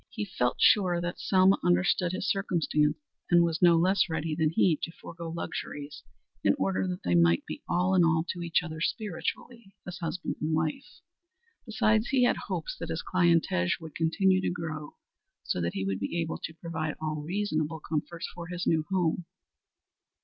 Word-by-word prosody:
He 215 Hz, -4 st, -4 dB
felt 125 Hz, -10 st, -1 dB
sure 180 Hz, -4 st, +4 dB
that 175 Hz, +1 st, -4 dB
Selma 190 Hz, 0 st, +4 dB
understood 175 Hz, 0 st, +2 dB
his 185 Hz, +1 st, -3 dB
circumstances 160 Hz, -6 st, +1 dB, 0.3 s
and 175 Hz, -1 st, +6 dB
was 165 Hz, 0 st, -1 dB
no 170 Hz, -2 st, +6 dB
less 180 Hz, +2 st, +3 dB
ready 160 Hz, 0 st, -2 dB
than 155 Hz, 0 st, +1 dB
he 165 Hz, +1 st, +3 dB
to 165 Hz, -, -3 dB
forego 170 Hz, 0 st, -9 dB
luxuries 145 Hz, -3 st, -6 dB, 0.4 s
in -, -, +4 dB
order 95 Hz, 0 st, 0 dB
that 90 Hz, 0 st, -4 dB
they 90 Hz, -, 0 dB
might 85 Hz, 0 st, +4 dB
be 75 Hz, -, -7 dB
all 180 Hz, +2 st, +2 dB
in 185 Hz, -2 st, +5 dB
all 160 Hz, 0 st, +2 dB
to 175 Hz, -, -3 dB
each 170 Hz, +1 st, +1 dB
other 160 Hz, -2 st, -6 dB
spiritually 215 Hz, +3 st, -4 dB
as 180 Hz, -1 st, -7 dB
husband 175 Hz, +1 st, -3 dB
and 155 Hz, +1 st, 0 dB
wife. 160 Hz, -, -3 dB, 0.7 s
Besides 220 Hz, 0 st, +2 dB
he 260 Hz, -2 st, +2 dB
had 245 Hz, -, +3 dB
hopes -, -, -3 dB
that -, -, -5 dB
his -, -, -3 dB
clientage 165 Hz, -, +2 dB
would 160 Hz, -2 st, -10 dB
continue 185 Hz, +3 st, +2 dB
to -, -, 0 dB
grow 160 Hz, -3 st, -5 dB, 0.5 s
so 90 Hz, -, -1 dB
that 85 Hz, 0 st, -1 dB
he 95 Hz, -, -2 dB
would 95 Hz, -1 st, -1 dB
be 100 Hz, +12 st, -2 dB
able 165 Hz, -1 st, -2 dB
to 160 Hz, -, -7 dB
provide 160 Hz, -2 st, -4 dB
all 155 Hz, -1 st, -3 dB
reasonable 160 Hz, -2 st, -2 dB
comforts 160 Hz, +2 st, -4 dB
for 170 Hz, -1 st, -8 dB
his 175 Hz, 0 st, -4 dB
new 160 Hz, -1 st, +2 dB
home. 180 Hz, -2 st, 0 dB
170 Hz, 180 wpm, -28 LUFS, 155-185 Hz, 0.7 s, and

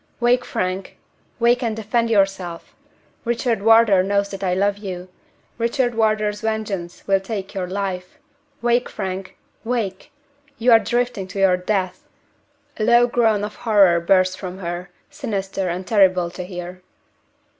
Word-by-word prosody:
"Wake, 245 Hz, +1 st, +3 dB
Frank! 185 Hz, +1 st, -3 dB, 0.4 s
wake 240 Hz, +1 st, +3 dB
and 230 Hz, -3 st, -1 dB
defend 230 Hz, +2 st, 0 dB
yourself! 195 Hz, -5 st, 0 dB, 0.5 s
Richard 235 Hz, -2 st, 0 dB
Wardour 225 Hz, -3 st, +6 dB
knows 200 Hz, +1 st, 0 dB
that 195 Hz, -1 st, -7 dB
I 180 Hz, -1 st, +1 dB
love 200 Hz, +1 st, +1 dB
you 185 Hz, -3 st, -6 dB, 0.5 s
Richard 240 Hz, +1 st, +1 dB
Wardour's 215 Hz, -2 st, +1 dB
vengeance 210 Hz, -6 st, -3 dB
will 195 Hz, -1 st, +3 dB
take 195 Hz, 0 st, -5 dB
your 185 Hz, -2 st, -3 dB
life! 185 Hz, -1 st, -4 dB, 0.5 s
Wake, 240 Hz, +1 st, +2 dB
Frank 190 Hz, 0 st, -5 dB, 0.3 s
wake! 225 Hz, 0 st, -3 dB, 0.5 s
You 240 Hz, 0 st, +3 dB
are 225 Hz, -, +8 dB
drifting 240 Hz, -5 st, -1 dB
to 190 Hz, +1 st, -6 dB
your 190 Hz, -2 st, +5 dB
death!" 185 Hz, 0 st, -2 dB, 0.7 s
A 215 Hz, -, -1 dB
low 240 Hz, +2 st, +5 dB
groan 225 Hz, -4 st, +2 dB
of 210 Hz, 0 st, -5 dB
horror 200 Hz, -7 st, +4 dB
bursts 185 Hz, +2 st, +3 dB
from 185 Hz, -1 st, -7 dB
her, 175 Hz, -1 st, -5 dB, 0.2 s
sinister 195 Hz, -9 st, -3 dB
and 180 Hz, +2 st, -4 dB
terrible 185 Hz, -4 st, +3 dB
to 180 Hz, 0 st, -6 dB
hear. 180 Hz, 0 st, -8 dB
200 Hz, 145 wpm, -21 LUFS, 185-225 Hz, 0.7 s, are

